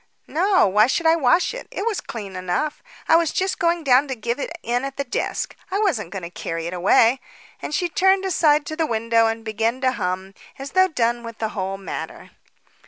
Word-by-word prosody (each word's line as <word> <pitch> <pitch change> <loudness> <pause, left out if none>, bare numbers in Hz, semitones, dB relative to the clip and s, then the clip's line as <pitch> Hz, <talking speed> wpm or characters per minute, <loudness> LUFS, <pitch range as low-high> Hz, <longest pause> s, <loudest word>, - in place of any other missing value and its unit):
"No. 370 +4 +3
Why 210 +4 +4
should 330 +6 -1
I 320 0 +6
wash 315 +3 +2
it? - - -8
It 400 - -4
was 450 -4 -1
clean 200 -5 -7
enough. 185 +12 -2 0.3
I - - +5
was 330 -2 +3
just 380 +1 -1
going 340 -1 +1
down 270 +1 +4
to 265 - -3
give 235 +3 -3
it - - -3
in 245 +2 -1
at 275 0 -5
the 280 - -1
desk. 245 - -3
I 380 - -1
wasn't 315 - 0
going 190 0 -6
to 170 - -7
carry 165 -1 -5
it 170 - -4
away." 225 +7 +4 0.4
And - - -5
she 355 +2 0
turned 380 +3 +2
aside 300 -5 +3
to 310 - -5
the 320 -1 0
window 230 0 +2
and 225 0 -3
began 225 +3 -1
to 260 -1 +3
hum, 190 -4 -3 0.2
as 275 +1 -7
though 375 0 +4
done 240 -6 0
with 230 -1 -9
the 220 - -2
whole 195 -2 -4
matter. 195 - -7
245 Hz, 220 wpm, -22 LUFS, 215-325 Hz, 0.4 s, I